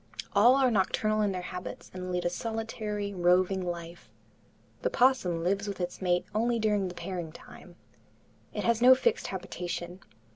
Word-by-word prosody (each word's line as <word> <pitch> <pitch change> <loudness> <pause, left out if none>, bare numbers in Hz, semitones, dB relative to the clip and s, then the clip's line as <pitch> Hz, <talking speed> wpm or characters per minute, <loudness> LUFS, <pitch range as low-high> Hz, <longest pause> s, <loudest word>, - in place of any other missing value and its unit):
All 235 +6 +6
are 265 -2 +3
nocturnal 215 +1 +1
in 205 -1 +2
their 180 -1 -4
habits 180 0 -7
and 185 0 -5
lead 180 0 -1
a - - +3
solitary, 215 -1 -4
roving 185 +1 +3
life. 170 -1 -6 0.7
The - - +1
opossum 245 - +2
lives 200 +3 0
with 200 -1 -5
its 180 +1 -4
mate 180 -1 +1
only 235 +2 +1
during 210 -3 +1
the 180 - -7
pairing 175 -2 -5
time. - - -14 0.8
It - - -4
has 235 -1 +2
no 255 +1 +9
fixed 465 - 0
habitation. 180 -1 -5
195 Hz, 160 wpm, -29 LUFS, 180-220 Hz, 0.8 s, no